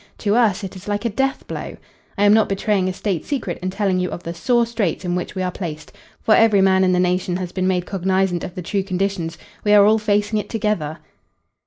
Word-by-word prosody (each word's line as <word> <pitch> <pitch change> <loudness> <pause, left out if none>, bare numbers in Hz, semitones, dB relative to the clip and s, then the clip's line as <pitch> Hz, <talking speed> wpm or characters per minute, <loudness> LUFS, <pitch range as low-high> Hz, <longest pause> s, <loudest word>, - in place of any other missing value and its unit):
To 205 - 0
us 220 -5 +2
it 195 0 -6
is 185 +2 -11
like 205 +2 -2
a - - +2
death 270 +5 -1
blow. - - -6 0.4
I 200 - +2
am 205 0 +6
not 220 0 +4
betraying 195 -1 0
a - - -1
state 185 -3 -2
secret 240 -11 -3
in 185 - -2
telling 190 -1 0
you 180 0 -1
of 175 - -7
the 170 - -5
sore 235 +8 +2
straits 210 -6 -2
in 175 - -1
which 180 +3 -3
we 185 - -1
are 180 - -1
placed, 155 -5 -7 0.3
for 220 - +4
every 220 -3 +5
man 190 0 +4
in 185 - +3
the 180 - +2
nation 180 0 0
has 180 -2 -5
been 185 0 -1
made 180 -1 0
cognizant 190 -2 0
of 180 - -7
the 180 - -5
true 200 +3 -1
conditions. 190 -3 -2 0.3
We 210 - +3
are 205 -1 +7
all 220 +1 +4
facing 210 0 +1
it - - -6
together." 210 -9 -1
190 Hz, 240 wpm, -21 LUFS, 180-210 Hz, 0.4 s, are